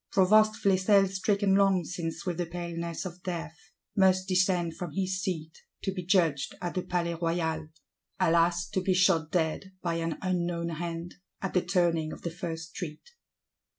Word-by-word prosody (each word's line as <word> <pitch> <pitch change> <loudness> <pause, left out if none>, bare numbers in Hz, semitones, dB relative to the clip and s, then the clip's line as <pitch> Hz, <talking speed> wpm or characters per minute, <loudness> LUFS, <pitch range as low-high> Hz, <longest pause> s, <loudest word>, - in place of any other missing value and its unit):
Provost 215 +3 +5
Flesselles 195 0 +3
stricken 200 0 +2
long 195 -2 +4
since 165 -1 -4
with 180 -2 -2
the 175 - -1
paleness 170 0 -4
of 180 0 -7
death, 170 -4 -4 0.4
must 185 -1 +4
descend 185 -3 +2
from 175 -5 -6
his 185 +1 -1
seat, 160 -5 -4 0.2
"to 195 - -1
be 180 -2 -4
judged 165 -7 +2
at 175 -1 -3
the 185 - -1
Palais 175 -1 -1
Royal:"—alas, 165 +1 0
to 190 - -1
be 185 0 +1
shot 175 -4 +3
dead, 175 +3 -1
by 170 -1 0
an 165 -1 -2
unknown 175 -2 -1
hand, 170 +1 -5 0.2
at 195 - -4
the 180 - +3
turning 175 -3 +1
of - - -9
the 170 - -2
first 165 -2 -5
street! 175 - -7
175 Hz, 160 wpm, -29 LUFS, 165-185 Hz, 0.4 s, Provost